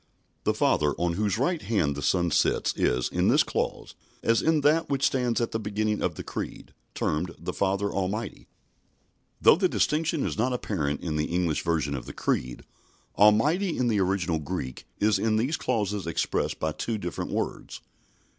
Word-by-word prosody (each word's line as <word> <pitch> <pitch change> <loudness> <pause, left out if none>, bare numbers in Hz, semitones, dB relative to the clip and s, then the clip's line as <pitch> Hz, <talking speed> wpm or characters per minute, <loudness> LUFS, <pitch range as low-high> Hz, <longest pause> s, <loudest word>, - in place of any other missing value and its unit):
The - - +2
Father 75 -1 +2
on 85 0 -1
whose 100 +1 0
right 160 +7 0
hand 80 -11 0
the 70 - -5
Son 85 +4 +1
sits - - +2
is, 60 0 +1
in - - 0
this - - +5
clause, - - -3 0.3
as 115 -1 +3
in 160 -1 +2
that 155 +3 +3
which 135 -1 +1
stands 125 -3 +1
at 115 - -1
the 110 - -1
beginning 105 0 -1
of - - -1
the - - -6
Creed, - - -6 0.2
termed 85 +3 -1
the - - -5
"Father 100 +1 0
Almighty." 100 +3 -3 0.9
Though - - +6
the 185 -1 +2
distinction 160 0 +1
is - - -3
not 125 +3 +1
apparent 80 -12 -2
in 80 -3 -2
the 75 - +1
English 85 -3 0
version 80 -4 0
of 65 - -5
the - - -7
Creed, 60 -1 -2 0.5
"Almighty" 150 - +4
in 125 -1 +1
the 105 -3 +1
original 90 -3 0
Greek 75 -5 -5
is 105 +1 +3
in 110 -1 +1
these 125 +8 +1
clauses 105 - -1
expressed 85 - -1
by 80 - 0
two 110 +8 -3
different 90 -4 -4
words. - - -4
100 Hz, 180 wpm, -27 LUFS, 85-120 Hz, 0.9 s, Though